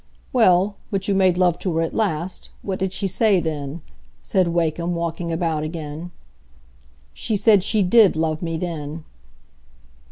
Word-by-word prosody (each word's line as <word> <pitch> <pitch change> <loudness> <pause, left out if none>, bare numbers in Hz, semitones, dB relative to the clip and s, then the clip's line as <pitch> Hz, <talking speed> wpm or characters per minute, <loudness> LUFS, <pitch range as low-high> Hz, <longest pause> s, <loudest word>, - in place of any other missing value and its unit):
"Well, 200 -4 +4
but 195 -3 -2
you 200 - +2
made 185 -2 +3
love 180 -2 +2
to 180 -4 -2
her 165 - +2
at 165 - -3
last. 185 -4 -2
What 190 -2 -3
did 190 -1 -1
she 195 - -2
say 195 +1 +2
then?" 155 -1 -4 0.4
said 185 -2 +1
Wakem, 170 0 -1
walking 170 0 -3
about 165 -2 -1
again. 155 +1 -6 1.0
"She 220 - -2
said 205 -1 +4
she 210 0 +1
did 205 +1 +5
love 155 0 -1
me 165 -2 -2
then." 160 -2 -5
175 Hz, 155 wpm, -22 LUFS, 160-195 Hz, 1.0 s, did